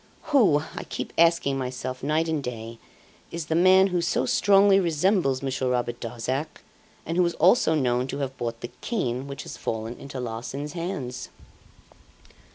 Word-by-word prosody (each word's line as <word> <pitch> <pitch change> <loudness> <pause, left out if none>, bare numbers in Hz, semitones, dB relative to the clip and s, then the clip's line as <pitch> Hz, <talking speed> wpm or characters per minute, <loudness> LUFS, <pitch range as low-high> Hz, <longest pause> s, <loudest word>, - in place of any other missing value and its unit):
Who, 190 - +5
I - - -5
keep - - -5
asking 165 -5 +3
myself 130 0 -4
night 155 +4 +1
and 160 -2 -1
day, 115 -2 -6 0.5
is 170 -2 -4
the 160 - -2
man 185 +3 +6
who 175 - +2
so 170 -6 0
strongly 195 +6 +5
resembles 165 -5 +1
Monsieur 130 -1 -1
Robert 120 -1 -1
Darzac, 125 +6 -4 0.4
and 165 +2 -3
who 180 - +4
is 170 - -3
also 175 -1 +4
known 125 -3 +1
to 140 - -4
have 135 -2 -3
bought 115 -2 -4
the 120 - -6
cane 130 - -2
which 140 0 -6
has - - -8
fallen 110 +1 -4
into 140 -1 -7
Larsan's 125 +5 -5
hands? 165 -8 -5
140 Hz, 165 wpm, -25 LUFS, 125-170 Hz, 0.5 s, man